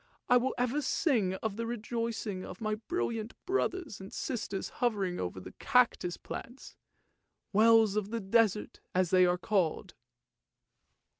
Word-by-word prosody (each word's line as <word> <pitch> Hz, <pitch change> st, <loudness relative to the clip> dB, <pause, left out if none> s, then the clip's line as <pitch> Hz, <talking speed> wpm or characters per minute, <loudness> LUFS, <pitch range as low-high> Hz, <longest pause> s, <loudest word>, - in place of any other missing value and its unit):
I 250 Hz, -, +6 dB
will 255 Hz, +2 st, 0 dB
ever 250 Hz, +4 st, +1 dB
sing 235 Hz, -, +1 dB
of 220 Hz, -2 st, -2 dB
the 230 Hz, 0 st, -2 dB
rejoicing 230 Hz, -4 st, -3 dB
of 180 Hz, -, -8 dB
my 215 Hz, -1 st, -1 dB
brilliant 225 Hz, -, -3 dB
brothers 370 Hz, -, -1 dB
and 190 Hz, -, -9 dB
sisters 205 Hz, -6 st, -3 dB
hovering 200 Hz, -7 st, 0 dB
over 90 Hz, +1 st, -3 dB
the 90 Hz, -, -10 dB
cactus 245 Hz, -9 st, +2 dB
plants, 245 Hz, +3 st, -8 dB, 0.4 s
' -, -, -51 dB
Wells 220 Hz, 0 st, +5 dB
of 210 Hz, -1 st, -1 dB
the 230 Hz, +1 st, -2 dB
desert,' 210 Hz, 0 st, +1 dB, 0.2 s
as 185 Hz, -2 st, +2 dB
they 185 Hz, -1 st, +6 dB
are 180 Hz, 0 st, +2 dB
called! 185 Hz, -1 st, 0 dB
220 Hz, 145 wpm, -31 LUFS, 190-240 Hz, 0.4 s, I